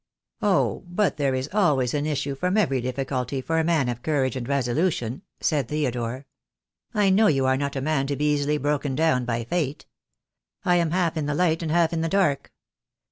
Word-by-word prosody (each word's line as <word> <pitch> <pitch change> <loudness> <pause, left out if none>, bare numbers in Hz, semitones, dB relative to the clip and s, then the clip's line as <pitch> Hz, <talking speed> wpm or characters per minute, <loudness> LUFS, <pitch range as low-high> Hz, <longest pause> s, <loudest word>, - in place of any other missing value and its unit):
" - - -64
Oh, 200 -3 +1
but 180 +1 0
there 140 -3 +1
is 130 +1 -2
always 145 - +2
an 145 0 -1
issue 145 -2 -1
from 180 +8 -1
every 135 - +2
difficulty 130 +1 -2
for 160 +5 -1
a - - +2
man 160 -5 +2
of 120 0 -3
courage 135 -4 0
and 125 -2 -4
resolution," 135 -1 0 0.2
said 145 -6 0
Theodore. 130 -3 -2 0.7
"I 205 -3 +2
know 210 +3 +5
you 135 -3 +2
are 130 0 +3
not 140 +1 -2
a 135 - -2
man 140 -1 0
to 140 - -1
be 150 +1 +1
easily 145 +1 0
broken 145 -1 -1
down 155 -5 +2
by 120 -1 -1
Fate. 150 +2 -2 0.8
I 180 0 +4
am 170 -2 +1
half 175 -1 0
in 150 -2 -1
the 145 - -1
light 165 0 +1
and 160 -2 -2
half 170 0 +2
in 165 - -1
the 165 - -1
dark. 180 -8 +1
145 Hz, 205 wpm, -24 LUFS, 130-165 Hz, 0.8 s, know